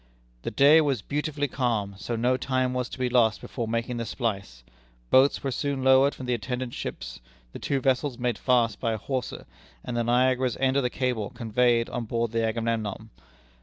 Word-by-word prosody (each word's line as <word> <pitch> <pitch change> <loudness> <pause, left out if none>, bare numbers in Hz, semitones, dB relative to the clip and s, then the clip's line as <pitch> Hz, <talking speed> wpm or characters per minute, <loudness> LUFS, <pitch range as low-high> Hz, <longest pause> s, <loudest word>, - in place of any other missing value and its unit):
"The - - -3
day 150 +4 +6
was 135 -8 -1
beautifully 145 0 -2
calm, 115 -7 -1
so 115 +4 -4
no 125 +3 +2
time 130 -1 -1
was 125 -1 -2
to - - -8
be 130 -1 0
lost 120 -3 +3
before 115 -3 -5
making 115 +2 -2
the 115 - -3
splice; 100 - -4 0.5
boats 135 +2 +4
were 135 - -1
soon 140 +1 -2
lowered 130 +2 +5
from 130 - -8
the 125 - 0
attendant 125 +1 -3
ships, - - -6 0.3
the - - -7
two 140 - -1
vessels 130 0 0
made 120 -4 -1
fast 120 -4 +2
by 115 -2 0
a - - -2
hawser, 130 +2 -4 0.4
and 125 - -4
the 120 - +1
Niagara's 125 +1 +2
end 135 0 +1
of 140 - +3
the 125 - 0
cable 125 -5 -2
conveyed 120 0 +1
on 120 - -4
board 115 0 -1
the 115 0 0
Agamemnon. 115 -2 -2
125 Hz, 195 wpm, -26 LUFS, 115-130 Hz, 0.5 s, day